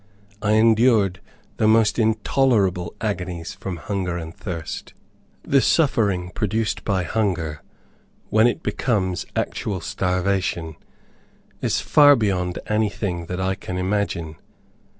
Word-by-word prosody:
I 105 0 +2
endured 110 -3 +4 0.4
the 110 - +2
most 110 0 +4
intolerable 110 -5 +1
agonies 90 -5 -3
from 95 -3 -6
hunger 90 +1 -3
and 80 0 -7
thirst. 85 -5 -6 0.5
The 135 -1 +3
suffering 100 - +2
produced 110 +3 -1
by 95 -3 0
hunger, 85 -8 -1 0.7
when 110 +2 +5
it 120 +7 -2
becomes 95 -8 -1
actual 100 -3 -2
starvation, 90 -2 -1 0.9
is - - 0
far 145 -1 +6
beyond 95 -6 -1
anything 100 -5 -1
that 90 +1 -4
I 95 +1 0
can 95 -1 -6
imagine. 90 -4 -2
95 Hz, 110 wpm, -22 LUFS, 90-110 Hz, 0.9 s, far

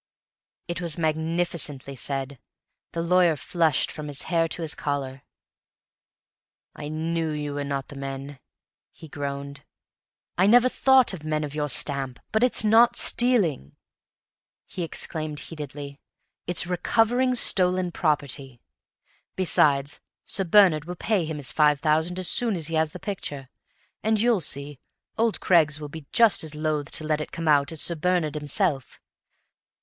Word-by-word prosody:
It 175 +1 -4
was 170 -3 -2
magnificently 160 -4 -2
said; 135 0 -4 0.5
the 165 - -3
lawyer 175 -1 +3
flushed 160 +1 0
from 150 -1 -7
his 145 -1 -4
hair 165 -2 +1
to 165 - -3
his 155 - -2
collar. 135 -2 -4 1.5
"I 145 - -7
knew 160 +1 -2
you 150 -1 -4
were 145 0 -3
not 140 -1 -4
the 145 - -10
men!" 135 0 -7 0.5
he 160 - -13
groaned. 140 0 -6 0.8
"I 190 - +5
never 245 +3 +6
thought 265 -4 +4
of 165 -5 -8
men 155 0 -1
of 145 -1 -6
your 150 -1 -2
stamp! 135 -1 -2
But 220 +2 +1
it's 250 -3 +5
not 230 +3 +5
stealing," 205 - +2 0.9
he 185 - -7
exclaimed 155 -2 -4
heatedly; 145 -2 -8 0.5
"it's 175 -1 +1
recovering 230 +8 +1
stolen 185 -5 +2
property. 140 -6 -2 0.8
Besides, 145 -6 +2 0.3
Sir 195 - +1
Bernard 170 -5 +5
will 180 +1 -6
pay 195 -1 0
him 155 -1 -5
his 140 -3 -4
five 150 -2 +3
thousand 160 +4 +1
as 185 -1 0
soon 230 -4 +2
as 165 -2 -3
he - - -6
has 160 -1 +1
the - - -8
picture; 145 -9 -6 0.5
and, 220 0 +1
you'll 230 -3 +2
see, 140 -2 0 0.4
old 225 -1 0
Craggs 155 -4 +3
will 150 -1 -7
be 155 -1 -10
just 230 -6 +4
as 155 -1 -6
loath 155 -1 -2
to 155 - -2
let 155 0 -1
it - - -7
come 165 -1 -5
out 145 -1 +3
as 160 - -1
Sir 170 - +1
Bernard 170 -2 0
himself. 150 - -1
155 Hz, 155 wpm, -25 LUFS, 145-180 Hz, 1.5 s, never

